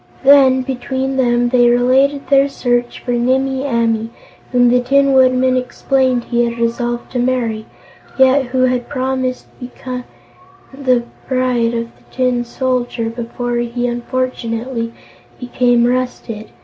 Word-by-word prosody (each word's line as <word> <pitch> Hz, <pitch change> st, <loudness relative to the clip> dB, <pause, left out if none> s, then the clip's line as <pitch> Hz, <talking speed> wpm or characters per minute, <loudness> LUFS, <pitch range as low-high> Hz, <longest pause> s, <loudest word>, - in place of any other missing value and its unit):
Then, 265 Hz, -2 st, +5 dB
between 265 Hz, +1 st, -3 dB
them, 240 Hz, -1 st, +2 dB
they 245 Hz, -1 st, +4 dB
related 265 Hz, +4 st, +2 dB
their 275 Hz, 0 st, +3 dB
search 245 Hz, -2 st, -1 dB
for 245 Hz, -, -4 dB
Nimmie 265 Hz, +3 st, 0 dB
Amee, 230 Hz, -3 st, 0 dB, 0.4 s
whom 245 Hz, -1 st, +4 dB
the 250 Hz, -, +4 dB
Tin 275 Hz, +2 st, +2 dB
Woodman 255 Hz, 0 st, +3 dB
explained 255 Hz, 0 st, 0 dB
he 240 Hz, 0 st, 0 dB
had 235 Hz, 0 st, -2 dB
resolved 240 Hz, +1 st, -2 dB
to 250 Hz, -, -2 dB
marry, 240 Hz, -3 st, -1 dB, 0.5 s
yet 265 Hz, +1 st, +4 dB
who 255 Hz, +1 st, 0 dB
had 250 Hz, -1 st, 0 dB
promised 260 Hz, -1 st, -2 dB
to 250 Hz, -, -11 dB
become 250 Hz, 0 st, -7 dB, 0.7 s
the 255 Hz, -3 st, +1 dB, 0.2 s
bride 250 Hz, -3 st, 0 dB
of 230 Hz, 0 st, -5 dB
the -, -, -26 dB
Tin 250 Hz, -2 st, 0 dB
Soldier 245 Hz, -2 st, -2 dB
before 240 Hz, +1 st, -4 dB
he 240 Hz, +1 st, -2 dB
unfortunately 240 Hz, -1 st, -3 dB, 0.5 s
became 245 Hz, -1 st, +1 dB
rusted. 245 Hz, -3 st, -3 dB
250 Hz, 135 wpm, -16 LUFS, 240-260 Hz, 0.7 s, Then